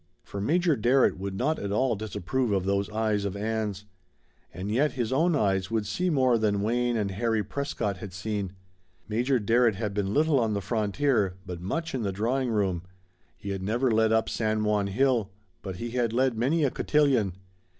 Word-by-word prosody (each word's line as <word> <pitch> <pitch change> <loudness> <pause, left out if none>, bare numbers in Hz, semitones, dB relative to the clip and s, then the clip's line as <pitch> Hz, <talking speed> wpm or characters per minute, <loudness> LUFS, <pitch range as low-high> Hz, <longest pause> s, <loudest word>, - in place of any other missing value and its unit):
For 100 - -6
Major 165 - +2
Darrett 125 -2 +3
would 95 0 -4
not 140 +9 0
at 100 - -4
all 125 +3 +2
disapprove 110 +4 -2
of 95 -2 +1
those 100 +1 0
eyes 110 -1 0
of 100 -1 -3
Ann's. 105 -1 -2 0.7
And 95 +4 -5
yet 140 +7 +2
his 120 -2 -2
own 165 +4 +3
eyes 95 -6 +1
would 110 -2 -1
see 180 - -1
more 130 -6 +3
than 100 -2 +1
Wayne 120 +2 +1
and 100 -3 -1
Harry 110 +2 0
Prescott 110 -4 -3
had 100 0 -8
seen. 95 0 -3 0.5
Major 120 +5 +1
Darrett 115 +1 +3
had 105 -1 -3
been 100 -1 -1
little 150 +2 +3
on 110 -3 0
the - - 0
frontier, 105 0 0
but 90 -2 -6
much 165 - -3
in 130 - -1
the 100 -3 -1
drawing 120 +6 0
room; 95 -6 0 0.6
he 100 - -6
had 95 -1 -3
never 120 +6 +1
led 110 0 +3
up 110 0 +2
San 110 -1 0
Juan 105 -1 +1
hill, 115 0 +1 0.3
but 95 -2 -6
he 115 +6 -5
had 120 -2 0
led 130 0 +2
many 140 +8 +1
a 135 - +2
cotillion. 135 - +2
110 Hz, 190 wpm, -27 LUFS, 100-125 Hz, 0.7 s, Darrett